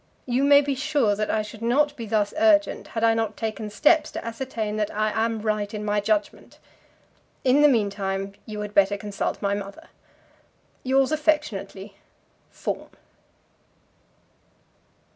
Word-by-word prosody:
You 250 +2 0
may 285 0 +7
be 285 -1 -1
sure 270 -6 +1
that 215 +1 -2
I 215 - +1
should 210 +1 -11
not 285 +5 +2
be 230 -4 -7
thus 205 -1 0
urgent 315 -1 +3
had 225 - 0
I 225 0 +5
not 225 -1 -2
taken 220 -1 -4
steps 300 +9 +3
to - - -6
ascertain 230 -3 -4
that 210 -1 0
I 215 +1 -1
am 225 -1 -1
right 210 -2 -1
in 210 -1 -5
my 210 0 +1
judgment. 305 +10 -2 0.9
In 265 +3 +4
the 295 - +7
meantime 200 -5 -1
you 210 -1 -5
had 210 0 -6
better 200 0 +3
consult 205 0 -4
my 200 0 +1
mother. 200 -1 -7 0.9
Yours 265 +2 +2
affectionately, 215 -11 -1 0.5
FAWN. - - -5
220 Hz, 145 wpm, -24 LUFS, 205-270 Hz, 0.9 s, may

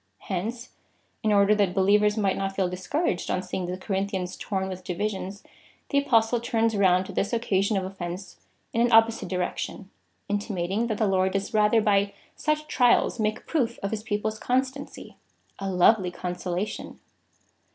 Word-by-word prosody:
Hence, 225 +7 -3 0.5
in 215 - +1
order 200 0 +5
that 200 -4 +1
believers 210 +2 +3
might 200 -3 +1
not 195 0 -3
feel 190 -2 +1
discouraged 185 - -2
on 185 - 0
seeing 185 -1 -4
the 180 +1 -3
Corinthians 190 -1 -2
torn 190 -2 -3
with 185 -1 -6
divisions, 195 +2 -3 0.5
the 280 - +3
Apostle 235 -4 +3
turns 230 -2 +1
round 185 -2 +3
this 200 +4 -2
occasion 200 -3 +1
of 190 - -1
of 190 +1 -8
fence 180 +2 -6 0.4
in 230 - +2
an 240 0 +3
opposite 225 0 +4
direction, 185 +1 -3 0.4
intimating 205 +1 -1
that 215 -3 -2
the 220 - +2
Lord 190 -1 +2
does 195 +2 -2
rather 215 +1 +4
by 200 -1 +2 0.2
such 305 0 -1
trials 245 -3 +3
make 215 0 -1
proof 240 -7 0
of 200 - -1
his 220 -1 -2
people's 215 0 -2
constancy. 265 +2 -2 0.4
A 195 0 -3
lovely 185 +1 +4
consolation 180 +2 -4
200 Hz, 160 wpm, -26 LUFS, 190-225 Hz, 0.5 s, order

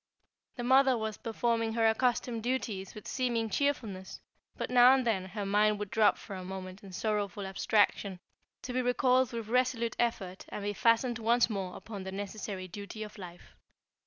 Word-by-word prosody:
The 245 - -4
mother 260 0 +5
was 220 -1 -3
performing 230 0 -1
her 225 -1 +3
accustomed 235 0 +1
duties 220 -6 -3
with 210 - -9
seeming 235 -4 -1
cheerfulness, 220 -8 -2 0.4
but - - -3
now 250 +1 +8
and 260 -2 0
then 200 -5 +1
her 200 +2 -5
mind 210 +1 +3
would 205 -1 -5
drop 220 -1 +4
for 195 - -8
a 185 - -6
moment 185 +1 -7
in 195 - -10
sorrowful 205 0 -2
abstraction 195 0 +1 0.4
to 250 - -5
be 255 - +1
recalled 250 0 +3
with 230 -2 -5
resolute 240 -2 +1
effort 195 -6 -1
and 205 - -6
be 205 0 -1
fastened 230 +2 +2
once 235 +1 +3
more 190 -3 -3
upon 205 -4 -7
the 190 - -6
necessary 195 -1 -5
duty 205 +4 -7
of 210 0 -10
life. 180 -2 -11
220 Hz, 175 wpm, -31 LUFS, 195-240 Hz, 0.4 s, now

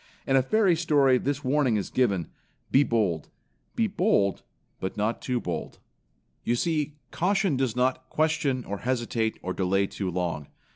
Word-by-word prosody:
In 135 - +2
a 135 - +6
fairy 190 +6 +3
story 145 -6 +3
this 145 +2 -2
warning 130 -4 +2
is 100 - -4
given: 100 -10 +1 0.4
"Be 135 - +6
bold; 105 - 0 0.5
be 230 - +2
bold 190 - +1 0.4
but 95 - -4
not 110 +3 -1
too 125 -2 -1
bold." - - -5 0.7
You 120 - +1
see 150 +1 -1 0.2
caution 195 -2 +1
does 130 -3 0
not 130 +1 0
question 150 -5 0
or 100 0 -4
hesitate 120 -3 -1
or 90 - -2
delay 95 +1 +1
too 95 -1 -4
long. 85 -5 -2
130 Hz, 155 wpm, -27 LUFS, 100-150 Hz, 0.7 s, a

